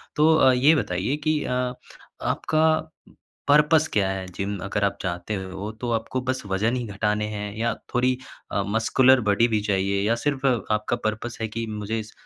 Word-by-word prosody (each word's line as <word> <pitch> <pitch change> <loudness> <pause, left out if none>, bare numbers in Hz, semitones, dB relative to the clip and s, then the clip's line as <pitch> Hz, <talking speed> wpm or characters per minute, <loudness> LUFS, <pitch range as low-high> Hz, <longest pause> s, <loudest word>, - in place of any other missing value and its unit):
तो 155 +2 +5
अ, 130 -4 +6
ये 140 +6 +5
बताइए 100 - -1
कि 155 -1 +2
अ, 125 0 -1 0.5
आपका 155 0 +1 0.6
पर्पज़ 150 +2 +5
क्या 100 -2 +2
है? 95 -1 -3
जिम 100 +1 -3
अगर 100 0 -2
आप 100 - +1
चाहते 90 +3 -3
हो 95 +2 -5
तो 120 - -2
आपको 115 +3 -2
बस 130 0 -2
वज़न 105 +5 0
ही 125 -2 -2
घटाने 105 +1 0
हैं 105 -1 -5
या 115 0 0 0.2
थोड़ी 125 +1 +2 0.3
अ, 100 - 0
मस्कुलर 125 +4 +4
बॉडी 110 +4 +4
भी 110 -2 +1
चाहिए 100 -1 0
या 115 +2 +2
सिर्फ़ 140 -2 -1
आपका 110 -2 0
पर्पज़ 110 +2 -3
है 110 - 0
कि 115 +2 -4
मुझे 110 +1 -3
स 110 - -14
110 Hz, 180 wpm, -24 LUFS, 100-130 Hz, 0.6 s, अ